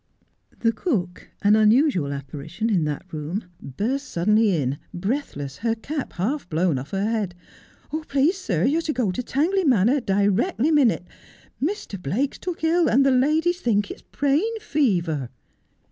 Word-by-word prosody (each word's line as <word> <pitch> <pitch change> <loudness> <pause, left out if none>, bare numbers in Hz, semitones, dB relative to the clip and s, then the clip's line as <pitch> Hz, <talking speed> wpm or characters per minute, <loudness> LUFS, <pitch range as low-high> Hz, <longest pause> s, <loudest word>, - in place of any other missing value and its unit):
The 230 - +3
cook, 210 - -3
an 205 +1 +6
unusual 215 - +3
apparition 145 +10 -4
in 175 -6 +2
that 150 +4 -3
room, 155 +7 -3 0.2
burst 245 - -3
suddenly 210 +5 +2
in, 140 -1 -1 0.2
breathless, 175 - -3
her 230 +1 0
cap 285 +5 -5
half 220 +6 -2
blown 160 -3 +1
off 135 - -8
her 195 0 -1
head. 215 -5 -1 0.4
' 315 - -6
Please, 290 +8 +2
sir, 180 - -1
you 300 +5 +2
are - - -1
to 315 -2 -2
go 240 -6 0
to 180 - -3
Tangley 335 +10 +1
Manor 255 - +4
directly 205 - +1
minute. 265 - +3 0.6
Mr. 295 - -3
Blake's 235 - -1
took 360 -3 -5
ill, 330 +1 +3
and 270 +3 +4
the 275 - +4
ladies 315 +7 +2
think 205 -3 +1
it's - - -9
brain 320 +12 0
fever.' 175 - 0
225 Hz, 160 wpm, -23 LUFS, 180-290 Hz, 0.6 s, an